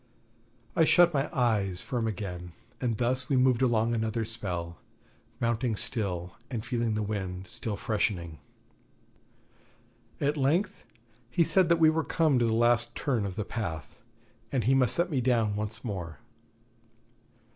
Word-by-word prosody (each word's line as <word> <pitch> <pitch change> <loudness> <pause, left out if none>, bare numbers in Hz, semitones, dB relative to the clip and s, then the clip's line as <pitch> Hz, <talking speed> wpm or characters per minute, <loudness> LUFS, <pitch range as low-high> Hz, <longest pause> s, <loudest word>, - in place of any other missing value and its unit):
I 165 - +5
shut 175 +2 +5
my 140 0 0
eyes 105 -7 +1
firm 120 -4 -2
again, 90 -4 -5 0.3
and 120 -4 0
thus 130 +2 0
we 140 - +2
moved 130 -1 +3
along 120 -2 +2
another 110 0 -1
spell, 90 -6 -4 0.6
mounting 115 0 0
still 90 -6 -3
and 115 -4 -4
feeling 115 -3 -1
the 105 - -1
wind 95 -3 -4
still 105 +3 -5
freshening. 85 -7 -1 1.8
At 145 +2 0
length 170 +9 0 0.4
he 170 +7 +3
said 185 +1 +3
that 170 - +5
we 160 -1 +6
were 160 0 0
come 155 -7 +2
to 120 - +3
the 115 - +1
last 120 0 +2
turn 120 -8 0
of 95 - -6
the 105 - -3
path, 80 -10 -5 0.5
and 130 -4 0
he 130 +6 +3
must 130 -2 +3
set 175 +1 0
me 135 -4 +1
down 115 -4 +2
once 105 +2 -4
more. 90 -7 -5
115 Hz, 150 wpm, -29 LUFS, 100-130 Hz, 1.8 s, we